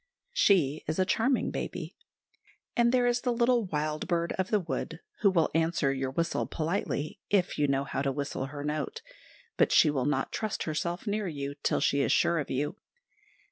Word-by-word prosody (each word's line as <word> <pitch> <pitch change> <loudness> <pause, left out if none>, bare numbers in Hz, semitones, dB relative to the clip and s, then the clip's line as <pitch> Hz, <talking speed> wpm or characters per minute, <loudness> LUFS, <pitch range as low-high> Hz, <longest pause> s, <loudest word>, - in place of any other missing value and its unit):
She 175 - +3
is 155 - -1
a 185 - +3
charming 235 +7 +1
baby. - - -5 0.8
And 235 0 +4
there 250 -1 +3
is 245 0 +2
the 250 - 0
little 240 -1 +2
wild 155 -2 -2
bird 170 -2 0
of 190 -1 -2
the 210 - +3
wood, 175 - -4 0.2
who 200 - +5
will 170 -4 +2
answer 160 -3 +1
your 135 -1 -2
whistle 165 +5 -1
politely, 165 +1 -2
if 185 -6 +1
you 145 - +3
know 135 0 +1
how 135 - -3
to 140 -1 0
whistle 140 -1 -3
her 145 +1 -7
note; 150 +1 -3 0.5
but - - +4
she 155 - +6
will 135 -4 -1
not 145 -2 0
trust 215 -2 -2
herself 170 +4 -2
near 210 -1 -1
you 140 -3 -4
till - - +1
she 140 -1 +2
is - - +1
sure 170 -1 +3
of 145 - -4
you. 145 +8 -2
165 Hz, 190 wpm, -29 LUFS, 145-200 Hz, 0.8 s, she